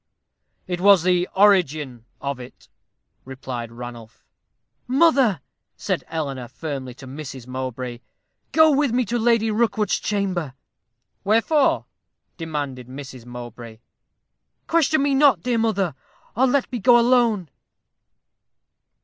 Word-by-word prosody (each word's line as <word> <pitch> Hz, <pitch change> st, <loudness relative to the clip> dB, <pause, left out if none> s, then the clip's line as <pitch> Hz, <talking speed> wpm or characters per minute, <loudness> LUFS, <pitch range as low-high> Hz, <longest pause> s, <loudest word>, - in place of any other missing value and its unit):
"It 180 Hz, -1 st, -4 dB
was 195 Hz, -3 st, +6 dB
the 180 Hz, 0 st, +2 dB
origin 155 Hz, -, +2 dB
of 140 Hz, -2 st, -4 dB
it," 125 Hz, 0 st, -13 dB, 0.6 s
replied 130 Hz, -3 st, -7 dB
Ranulph. 120 Hz, -2 st, -10 dB, 0.6 s
"Mother," 265 Hz, -, +3 dB, 0.4 s
said -, -, -2 dB
Eleanor, 140 Hz, -6 st, -4 dB
firmly, 130 Hz, 0 st, -6 dB
to 135 Hz, -, -12 dB
Mrs. 135 Hz, -2 st, -8 dB
Mowbray, 130 Hz, -1 st, -5 dB, 0.5 s
"go 315 Hz, 0 st, +6 dB
with 285 Hz, -2 st, +2 dB
me 250 Hz, 0 st, +1 dB
to 235 Hz, +4 st, -1 dB
Lady 225 Hz, -1 st, +2 dB
Rookwood's 215 Hz, -2 st, +1 dB
chamber." 185 Hz, -9 st, -2 dB, 0.7 s
"Wherefore?" 230 Hz, +8 st, +2 dB, 0.5 s
demanded 145 Hz, -7 st, -5 dB
Mrs. 130 Hz, -2 st, -10 dB
Mowbray. 120 Hz, -2 st, -9 dB, 0.9 s
"Question 315 Hz, -3 st, +2 dB
me 285 Hz, -1 st, +1 dB
not, 270 Hz, -, +4 dB
dear 245 Hz, -2 st, 0 dB
mother, 200 Hz, -7 st, 0 dB, 0.4 s
or 260 Hz, +4 st, +3 dB
let 265 Hz, +1 st, 0 dB
me 245 Hz, -, -3 dB
go 240 Hz, +4 st, +6 dB
alone." 235 Hz, -, +2 dB
175 Hz, 115 wpm, -22 LUFS, -, 0.9 s, was